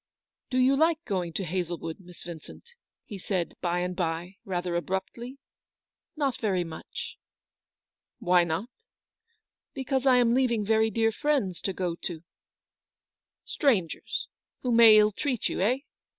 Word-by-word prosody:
" - - -64
Do 255 - -1
you 260 +2 +5
like 320 +2 +2
going 180 -4 -2
to 195 - -2
Hazlewood, 170 -1 -3
Miss 180 -2 -13
Yin 170 -2 -6
cent? 470 - -14 0.2
" - - -65
he 205 -4 -8
said, 180 -2 -2
by 175 0 0
and 180 0 -2
by, 175 +1 -3
rather 180 -2 -2
abruptly. 190 +9 -3 0.4
" - - -64
Not 280 -4 0
very 190 -5 +1
much." 165 -2 -8 0.3
" - - -66
« - - -65
Why 180 0 +4
not?" 170 +8 -2 0.6
" 450 -1 -49
Because 265 0 -1
I 255 - +7
am 235 -1 +4
leaving 240 -4 +2
very 220 +1 +3
dear 225 0 +2
friends 220 - 0
to 195 - -1
go 180 -2 -2
to—" 170 -1 -6 0.7
" - - -65
Strangers, 210 - 0 0.4
who 250 - 0
may 230 -2 +8
illtreat 215 +4 +2
you, - - -3
eh 230 +7 +3
200 Hz, 165 wpm, -28 LUFS, 175-250 Hz, 0.7 s, may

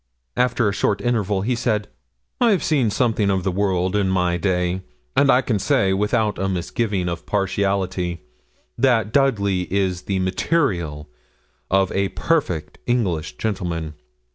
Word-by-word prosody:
After 125 -2 +2
a 100 - 0
short 100 0 0
interval 105 -5 0
he 125 +4 0
said 110 -3 0 0.5
'I've 225 -6 +3
seen 150 - +2
something 110 -2 +1
of 95 -2 +1
the 95 - 0
world 95 0 0
in 100 -2 +2
my 90 -2 +1
day, 90 0 0 0.3
and 140 - +4
I 125 - +5
can 110 -5 0
say 95 0 +2
without 105 +2 0
a 95 0 0
misgiving 95 +1 -1
of 85 -1 -5
partiality, 95 -3 -1 0.6
that 115 -5 +2
Dudley 100 -10 +1
is 95 -2 0
the 95 - -1
material 95 - 0 0.6
of 95 0 +2
a 100 0 0
perfect 90 - -1
English 100 -11 -1
gentleman. 85 -7 -3
100 Hz, 140 wpm, -22 LUFS, 90-115 Hz, 0.6 s, I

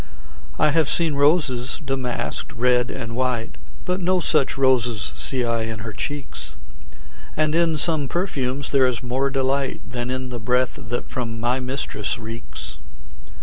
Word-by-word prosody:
I 155 - +4
have 160 -1 +3
seen 165 -3 +2
roses 140 -4 +2
damask'd, 130 +1 -2
red 125 0 +3
and 115 -3 -4
white, 125 -2 -1 0.3
But 180 +1 0
no 185 +1 +3
such 155 -6 +2
roses 120 -7 +3
see 130 -2 -2
I 115 -1 +1
in 110 -1 -3
her 110 0 -5
cheeks; 140 +8 -5 0.8
And 155 0 +3
in 165 -1 +3
some 150 -2 0
perfumes 140 -6 -1
is - - -6
there 130 -2 +5
more 130 +3 +1
delight 135 0 0
Than 120 0 -3
in 130 0 -2
the 120 -1 -4
breath 125 +3 +1
that 120 +2 -3
from 115 -3 -3
my 120 +3 +1
mistress 125 -5 -2
reeks. 115 0 -7
130 Hz, 150 wpm, -24 LUFS, 120-145 Hz, 0.8 s, there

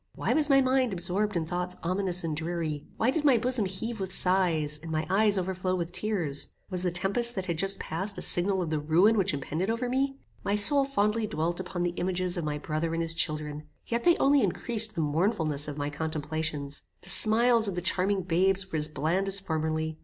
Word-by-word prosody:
Why - - 0
was 305 -1 +2
my 275 -1 +6
mind 255 -3 +2
absorbed 190 +4 -1
in 165 -2 0
thoughts 180 +2 -3
ominous 180 0 0
and 160 -2 -2
dreary? 160 -2 -3
Why 235 +3 +2
did 300 +2 -1
my 275 -5 +5
bosom 245 -1 +1
heave 220 +4 -5
with 190 -1 -4
sighs, 170 -6 +1
and 165 - -8
my 155 0 -1
eyes 205 +1 +3
overflow 185 0 -1
with 170 -1 -3
tears? 175 -10 -2 0.2
Was 180 -1 0
the 180 - +1
tempest 195 +7 +2
that 190 -2 -3
had 170 -3 -3
just 195 +2 +3
past 190 +5 -3
a - - -1
signal 190 +1 +2
of 160 - -4
the 155 - 0
ruin 170 +9 +4
which 195 -4 +2
impended 155 +7 -3
over 230 +2 -1
me? 270 +2 0 0.3
My 200 - 0
soul 275 +7 +4
fondly 215 -4 0
dwelt 170 0 -2
upon 180 -1 -4
the 175 -1 -1
images 180 0 -1
of 175 - -3
my 150 -1 -2
brother 155 +2 -3
and 165 - -1
his 165 0 -2
children, 150 -2 -2 0.2
yet 235 0 -2
they 345 -1 +5
only 280 0 +4
increased 215 +3 0
the 165 - -1
mournfulness 155 -2 0
of 145 -1 -6
my 145 0 -3
contemplations. 155 -1 -4 0.2
The - - -9
smiles 230 +1 +4
of 195 - -3
the - - -1
charming 190 +2 +1
babes 190 +3 +1
were 160 - -1
as 150 - +3
bland 160 +6 -1
as 195 0 0
formerly. 160 -2 -2
180 Hz, 215 wpm, -28 LUFS, 160-210 Hz, 0.3 s, my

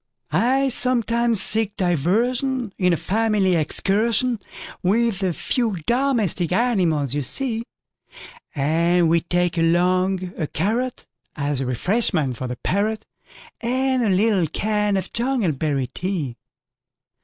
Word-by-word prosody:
I 255 - +2
sometimes 235 -3 +1
seek 215 -1 0
diversionIn 225 - 0 0.2
a 170 - +2
family 210 -1 +1
excursionWith 215 +3 0
the 190 -2 0
few 225 +5 -1
domestic 235 - 0
animals 180 - +1
you 145 - -1
see; 230 - -1 0.9
And 165 +4 +2
we 165 0 +3
take 175 0 0
along 180 +2 +1
a 155 - -1
carrotAs 165 - -3
refreshment 150 - 0
for 130 - -4
the 125 - -4
parrot, 215 +3 -1 0.5
And 260 +2 0
a 220 - +1
little 195 -2 +2
can 210 +4 0
of 190 - -5
jungleberry 160 - 0
tea. 170 -9 -3
195 Hz, 105 wpm, -22 LUFS, 170-235 Hz, 0.9 s, we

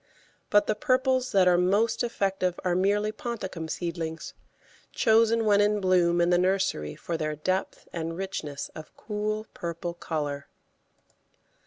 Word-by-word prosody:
But 205 0 +4
the - - +1
purples 255 +2 +1
that 190 -2 +4
are 175 -1 +5
most 205 +7 +2
effective 195 -6 -1
are 180 - +1
merely 205 +3 +2
ponticum 195 -8 -5
seedlings, 165 -2 -4 0.6
chosen 225 0 +3
when 205 -1 +5
in 210 0 +2
bloom 180 -2 +3
in 175 +1 +3
the 175 - +4
nursery 180 - 0
for 170 - -4
their 155 -1 -2
depth 185 +5 -2
and 165 0 -4
richness 160 -7 -5
of 155 -1 -11
cool 215 0 -3
purple 170 0 -4
colour. 145 -4 -4
185 Hz, 140 wpm, -27 LUFS, 170-210 Hz, 0.6 s, are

